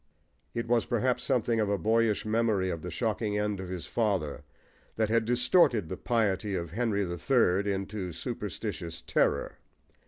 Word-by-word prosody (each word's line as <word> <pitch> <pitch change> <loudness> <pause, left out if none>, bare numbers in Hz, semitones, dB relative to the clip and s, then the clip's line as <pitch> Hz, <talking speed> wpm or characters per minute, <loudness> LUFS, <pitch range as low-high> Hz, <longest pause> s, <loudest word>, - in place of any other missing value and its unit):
It 115 0 -2
was 120 -1 +2
perhaps 125 +2 +1
something 120 -3 +1
of 105 -2 +1
a 100 - +1
boyish 110 +3 +2
memory 110 -4 +1
of 85 - -4
the 90 - -5
shocking 105 +2 -1
end 105 -1 -1
of 95 -1 -6
his 90 -2 -5
father 95 -11 -1 0.5
that 110 -1 +1
had 115 0 +2
distorted 120 - +3
the - - -3
piety 105 -4 0
of 85 -3 -4
Henry 105 -1 0
the 85 -1 -5
Third 100 - +2
into 100 -1 -3
superstitious 85 0 -5
terror. - - 0
105 Hz, 160 wpm, -29 LUFS, 95-115 Hz, 0.5 s, distorted